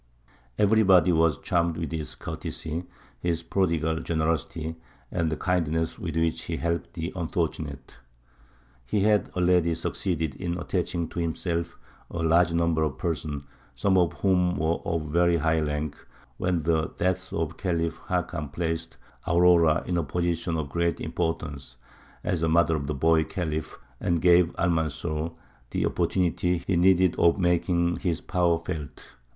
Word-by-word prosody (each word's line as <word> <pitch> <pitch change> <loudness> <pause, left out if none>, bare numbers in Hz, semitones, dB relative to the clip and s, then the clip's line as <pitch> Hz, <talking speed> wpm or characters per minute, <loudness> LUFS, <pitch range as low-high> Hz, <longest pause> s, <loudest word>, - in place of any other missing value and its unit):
Everybody 100 -4 +5
was 80 -2 +3
charmed 85 -2 0
with 80 -2 -3
his 80 -3 -4
courtesy, 80 +3 -5 0.3
his 85 -1 -1
prodigal 80 -4 0
generosity, 80 0 -2 0.3
and 80 -1 0
the 80 - -2
kindness 80 -3 0
with 80 -3 -4
which 80 0 +1
he - - -3
helped 85 0 -2
the 85 +1 -4
unfortunate. 80 -5 -3 0.9
He 95 - 0
had 105 0 +3
already 90 -2 +3
succeeded 80 -2 -2
in 85 -1 -3
attaching 85 -1 -2
to 90 - -5
himself 85 0 -2 0.3
a - - -6
large 85 +1 +4
number 85 -1 +1
of 75 -4 -1
persons, 75 -4 -3 0.3
some 100 -1 +2
of 90 -4 +3
whom 90 -3 +2
were 80 +3 0
of 80 -3 -2
very 85 +1 +3
high 80 0 +2
rank, 75 0 -2 0.4
when 90 -3 0
the 80 -1 +1
death 95 +1 -1
of 80 -2 -1
the - - -12
Khalif 85 -2 -2
Hakam 75 -3 -2
placed 80 +1 -3 0.3
Aurora 85 -2 +5
in 90 - -1
a 85 - +1
position 85 +2 -1
of 75 -3 -3
great 85 +2 0
importance, 75 -7 -3 0.5
as 85 - -1
mother 85 0 +3
of 70 -2 -3
the 75 - -2
boy 80 +3 +3
Khalif, 80 -4 -4 0.2
and 85 -1 +1
gave 90 0 +5
Almanzor 80 -1 -1 0.4
the - - 0
opportunity 90 -1 +1
he 95 - +1
needed 90 0 +4
of 85 +2 +4
making 85 -1 +1
his 85 -2 -1
power 90 -3 +1
felt. 80 -4 -7
85 Hz, 145 wpm, -26 LUFS, 80-90 Hz, 0.9 s, Everybody